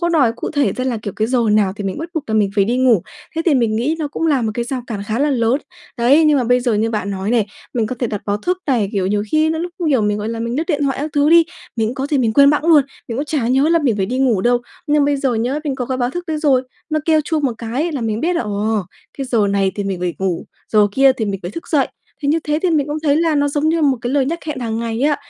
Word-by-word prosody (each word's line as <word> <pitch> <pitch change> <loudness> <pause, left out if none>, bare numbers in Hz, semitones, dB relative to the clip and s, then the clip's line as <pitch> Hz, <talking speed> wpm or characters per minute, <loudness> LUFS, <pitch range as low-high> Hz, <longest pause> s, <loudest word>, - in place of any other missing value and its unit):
có 345 - +1
đòi 290 -9 +3
cụ 230 - -5
thể 285 -3 +1
ra 255 - -3
là, 255 -3 -1
kiểu, 205 - -4
cái 220 - +1
giờ 255 0 +1
nào 205 -3 +3
thì 205 - -5
mình 190 -1 -3
bắt 325 +2 -5
buộc 320 -3 -2
là 220 - -2
mình 210 -2 +2
phải 200 - +3
đi 235 +5 0
ngủ, 250 -8 +3 0.3
thế 325 - 0
thì 320 - +4
mình 230 -4 +1
nghĩ 275 +8 0
nó 305 -2 -2
cũng 325 +3 -2
là 285 -6 +2
một 220 - 0
cái 240 - -2
rào 250 +1 -4
cản 210 -5 -4
khá 225 +3 -1
là 290 +1 +2
lớn. 240 -1 +2 0.4
Đấy, 275 +7 +5
nhưng 300 -2 +4
mà 250 - 0
bây 250 +1 +3
giờ 240 -2 0
như 220 +2 +1
bạn 210 -3 -2
nói 195 +1 -3
này, 230 -4 +2 0.3
mình 230 -3 +1
có 255 - -4
thể 245 - 0
đặt 210 -2 -4
báo 205 0 0
thức 360 - -2
này, 240 -8 +1
kiểu, 190 -2 0
nhiều 205 +1 0
khi 310 0 +3
nó 320 - -2
lúc, 350 +1 -4 0.2
kiểu, 265 -6 +2
mình, 210 0 0
gọi 210 - -3
là, 230 0 -4
mình 235 +2 -2
lướt 315 - 0
điện 295 -5 0
thoại 275 -2 0
các 305 +2 -3
thứ 290 0 +3
đi, 335 0 +7 0.3
mình 225 -1 +1
cũng 240 - -4
có 270 +1 -3
gì 290 -2 0
mình 230 -3 +1
quên 280 +3 +6
bẵng 295 +1 0
luôn, 315 -4 +6 0.3
mình 235 +1 -3
cũng 285 - -1
chả 285 -6 -1
nhớ 270 +5 +3
là 335 - +4
mình 260 -9 +1
phải 190 -2 0
đi 255 +2 -2
ngủ 245 -7 +2
đâu. 245 +4 +3 0.3
Nhưng 295 -1 +3
bây 285 0 +1
giờ 270 -3 0
nhớ, 245 +6 -1
mình 285 -3 -1
có 250 -2 -4
cái 260 - -2
báo 245 -1 0
thức 350 +5 -5
đấy 320 -2 -2
rồi, 275 -4 +3 0.3
nó 310 - +1
kêu 315 -1 +3
chuông 305 0 -2
một 260 - +1
cái 230 -1 -6 0.2
là 280 - -3
mình 220 -1 -2
biết 350 +2 0
là, - - 0
ồ, 210 0 -1 0.4
cái 275 - -2
giờ 230 -5 +2
này 195 -1 +1
thì 205 - -3
mình 190 -2 -3
phải 180 -1 -2
ngủ, 185 -3 -2 0.3
giờ 210 -1 +5
kia 270 +3 +5
thì 240 -4 -3
mình 195 -2 -3
phải 175 - -5
thức 335 - -8
dậy, 285 -4 +2 0.3
thì 285 - 0
như 310 +3 +3
thế 300 0 0
thì 365 - +2
mình 300 -4 +1
cũng 295 0 -3
thấy 290 -2 +3
là 330 -1 +2
nó 285 0 +2
giống 295 +2 0
như 330 0 +1
một 275 -3 +3
cái 240 - -3
lời 275 -2 +2
nhắc 335 +4 -2
hẹn 305 - -3
hàng 225 -2 -2
ngày 230 -1 -3
ấy 230 - -2
ạ. 290 - +1
255 Hz, 325 wpm, -18 LUFS, 220-295 Hz, 0.4 s, đi